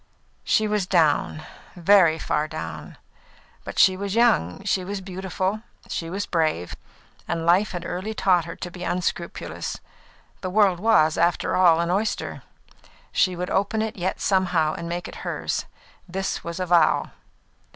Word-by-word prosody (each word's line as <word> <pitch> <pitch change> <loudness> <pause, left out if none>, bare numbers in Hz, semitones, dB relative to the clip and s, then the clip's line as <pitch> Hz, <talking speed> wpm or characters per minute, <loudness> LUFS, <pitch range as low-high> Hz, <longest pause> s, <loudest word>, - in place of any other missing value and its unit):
She 215 - +2
was 210 -3 0
down 155 -3 +2 0.3
very 175 -2 +5
far 155 -1 -1
down; 155 0 -7 0.7
but - - -8
she 190 -1 +6
was 200 +1 -4
young, 90 - +2
she 185 - 0
was 200 +2 -4
beautiful, 190 +2 -3 0.3
she 165 - -3
was 195 +3 -3
brave, 155 - -1 0.5
and 165 -1 -2
life 180 +5 +3
had 175 - -5
early 200 +5 -4
taught 180 -5 +3
her 170 - -7
to 175 - -7
be 180 0 -8
unscrupulous. 175 -1 -3 0.6
The 185 - -3
world 190 -2 +3
was, 175 -7 +3
after 170 +1 +1
all, 170 -3 +5
an 170 +1 0
oyster; 210 +4 -2 0.7
she 185 -1 +2
would 180 +1 -4
open 215 +3 +1
it 220 - -4
yet 185 0 -2
somehow 175 -5 +2
and 170 0 -6
make 175 +1 -4
it - - -10
hers; - - -3 0.4
this 190 +2 -3
was 170 +1 -5
a 185 - -1
vow. 175 -1 +3
180 Hz, 155 wpm, -24 LUFS, 170-195 Hz, 0.7 s, she